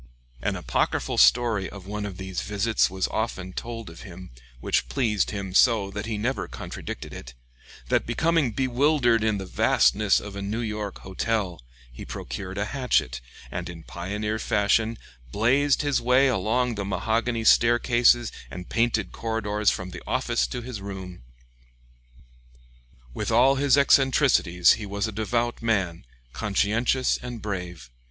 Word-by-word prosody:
An - - -1
apocryphal - - -1
story 115 -5 +4
of 100 -2 -11
one 105 +1 -4
of 95 -3 -8
these 95 -1 -4
visits 105 +2 +1
was 95 0 -1
often 95 -5 -3
told 115 0 -6
of 85 0 -11
him, 90 - -11 0.3
which - - 0
pleased 110 -8 0
him 100 -3 -5
so 105 -2 +4
that 105 +2 -5
he 110 -2 -2
never 125 +6 -2
contradicted - - -7
it: - - -10 0.5
that - - +1
becoming 160 +3 +1
bewildered 125 -1 +2
in 110 -2 +1
the 95 - -5
vastness 100 +2 +3
of 100 -1 -9
a 100 - -5
New 105 +4 -3
York 105 -3 -4
hotel, 95 - -2 0.3
he - - -9
procured 95 -1 -6
a 100 - 0
hatchet, 105 - 0 0.3
and 90 0 -4
in 85 -2 -9
pioneer 105 +6 -4
fashion 110 +2 +1 0.3
"blazed" 135 +7 +2
his 145 -1 +1
way 125 +3 +4
along 125 0 +1
the 100 -2 -4
mahogany 115 +4 -1
staircases 120 0 +4 0.2
and 90 +5 -8
painted 115 -5 0
corridors 105 -2 -1
from 90 -1 -3
the - - -8
office - - 0
to 120 - -5
his 120 -4 -7
room. 95 -5 -8 1.9
With 105 - -3
all 125 +4 +5
his 140 -1 +3
eccentricities, 135 - +4
he 110 - -5
was 100 +2 -2
a - - -4
devout 115 +3 -1
man, 95 - -1 0.3
conscientious 115 +5 +1
and 120 -2 -6
brave. 90 - -6
110 Hz, 145 wpm, -25 LUFS, 95-120 Hz, 1.9 s, all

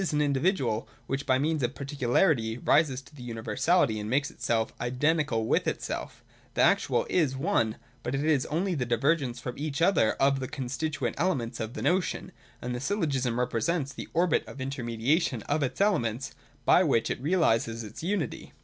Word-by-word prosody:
315 155 -6 0
an 150 - +3
individual, 135 - 0 0.2
which 135 +1 -3
by 130 - +4
means 155 +2 0
of 125 +1 -1
particularity 130 -3 +1
rises 135 -1 +2
to 130 - -18
universality 115 +2 +1
and 105 0 -4
makes 140 +3 +1
itself 115 -1 -1
identical 130 -1 +1
with - - +1
itself - - -4
— - - -31
The - - +4
actual - - +3
is 145 -7 +1
one: 115 -6 +1 0.3
but 120 +2 -2
it 140 - -1
is 150 -4 +3
also 180 +5 0
the 140 -7 -1
divergence 125 +1 +1
from 125 +2 -6
each 150 0 -3
other 165 - +4
of 135 0 +2
the 130 - -3
constituent 140 +5 -3
elements 130 -9 0
of 110 +2 -4
the - - -4
notion; 185 0 0 0.3
and 125 - -3
the 125 - -3
Syllogism 135 - 0
represents 135 +4 0
the - - -8
orbit 170 0 +2
of 140 - -10
intermediation 130 - 0
of 150 +1 0
its 135 - -2
elements, 135 - +1 0.3
by 180 - +6
which 135 -9 +2
it - - -3
realises 115 -8 +1
its 105 0 -9
unity. 175 - -3
135 Hz, 175 wpm, -28 LUFS, 120-155 Hz, 0.3 s, by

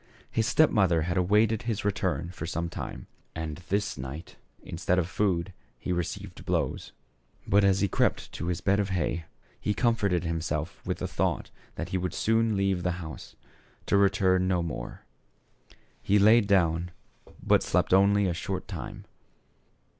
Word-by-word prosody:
His 110 -1 +1
step 155 - +4
mother 90 -7 +3
had 85 +2 -2
awaited 105 +4 +3
his 115 -4 -3
return 90 -3 -1
for 85 -3 -6
some 85 0 -2
time, - - -6 0.3
and 80 -2 -4
this 100 -6 -1
night 70 +6 -7 0.3
instead 90 +2 -1
of 90 -3 +1
food 95 -2 0 0.2
he - - -4
received 90 +2 -4
blows. - - -1 0.5
But 100 0 +4
as 95 -1 +3
he 100 - +3
crept - - 0
to 85 - -5
his 90 -2 -2
bed 100 +1 +2
of 100 -1 0
hay, 85 -3 -1 0.3
he 105 - -1
comforted 100 -7 +1
himself 80 -1 -3
with - - -1
the - - -3
thought - - -1 0.2
that 85 - -4
he 95 - -1
would 90 0 -3
soon 110 -1 +2
leave 95 -2 +1
the 90 0 0
house, 80 -3 -9 0.5
to - - +1
return 95 -2 +3
no 90 -2 +1
more. 75 -8 -6 1.0
He 100 - +3
laid 105 +1 +6
down, 85 -3 +2 0.5
but - - +4
slept - - +1
only 100 +1 +5
a 90 - 0
short 95 +2 -4
time. - - -7
95 Hz, 160 wpm, -28 LUFS, 85-100 Hz, 1.0 s, laid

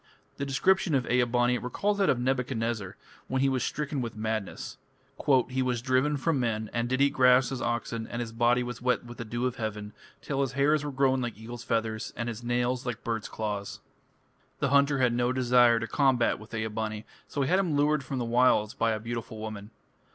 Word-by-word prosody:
The 140 - -3
description 175 +3 +2
of 130 -2 +1
Ea 125 0 +4
bani 120 +1 +1
recalls 200 +12 -1
that 195 - +3
of 130 - +3
Nebuchadnezzar 120 -5 -2 0.3
when 130 0 0
he 135 - +4
was 130 -2 0
stricken 145 -2 -2
with 115 -3 -5
madness. 110 -2 -4 0.7
"He 130 +1 -1
was 125 -2 0
driven 130 +3 +2
from 140 +1 0
men, 110 -3 -1
and 120 0 -1
did 130 +2 0
eat 140 0 +4
grass 125 -2 +5
as 130 - -4
oxen, 115 -1 -2
and 120 - -5
his 115 -2 -4
body 120 +2 +2
was 120 -1 -6
wet 125 -1 +1
with 120 0 -11
the 115 - -4
dew 120 +3 -2
of 125 -1 -2
heaven, 105 -2 -4 0.3
till 140 -1 -2
his 135 -3 -1
hairs 145 +2 +2
were 145 - -3
grown 130 -1 +2
like 120 -3 -4
eagles' 115 +2 -8
feathers, 110 -2 -2
and 120 0 -3
his 115 0 -7
nails 120 +1 0
like 120 -2 -5
birds' 115 -2 -3
claws." 105 -2 -4 0.8
The 140 - 0
hunter 140 +1 +4
had 125 -2 +2
no 120 +1 +1
desire 125 -2 +4
to 115 - -3
combat 125 0 +2
with 110 +2 -10
Ea 110 0 -1
bani, 110 0 -4 0.2
so 140 - -1
he - - -1
had 185 +5 +3
him 175 -6 0
lured 145 0 +2
from 135 0 -4
the 120 - -1
wilds 115 -2 +3
by 115 -3 +1
a 110 - -3
beautiful 115 0 -5
woman. 110 -1 -7
120 Hz, 215 wpm, -28 LUFS, 115-130 Hz, 0.8 s, grass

